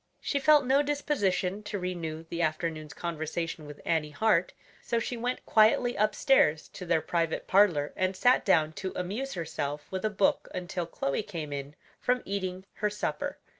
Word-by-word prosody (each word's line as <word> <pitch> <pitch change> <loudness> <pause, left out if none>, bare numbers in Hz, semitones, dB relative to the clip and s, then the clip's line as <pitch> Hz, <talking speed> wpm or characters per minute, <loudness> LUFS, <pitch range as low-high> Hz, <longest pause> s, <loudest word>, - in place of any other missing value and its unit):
She 280 - -1
felt 295 0 +5
no 270 +3 +4
disposition 210 -10 0
to 210 -1 -4
renew 170 -4 -4
the 170 +1 -3
afternoon's 155 -1 -2
conversation 165 -1 -4
with 150 -1 -10
Annie 160 -2 +1
Hart, 185 +2 +2 0.3
so 235 - -1
she 230 +2 -2
went 245 +2 -3
quietly 230 +3 +4
upstairs 210 - +3
to 180 - -9
their 165 -1 +3
private 165 -1 -1
parlor 180 -7 +3
and 185 0 0
sat 245 +6 +4
down 160 -5 +3
to 190 -1 -3
amuse 210 +10 -3
herself 150 -3 -3
with 190 -1 -3
a 215 - +2
book 205 -2 +1
until 175 -1 -3
Chloe 140 0 -1
came 165 -8 -6
in 140 +1 -6 0.2
from 250 0 +1
eating 190 -1 -3
her 210 - +1
supper. 210 0 -3
185 Hz, 170 wpm, -29 LUFS, 160-215 Hz, 0.3 s, felt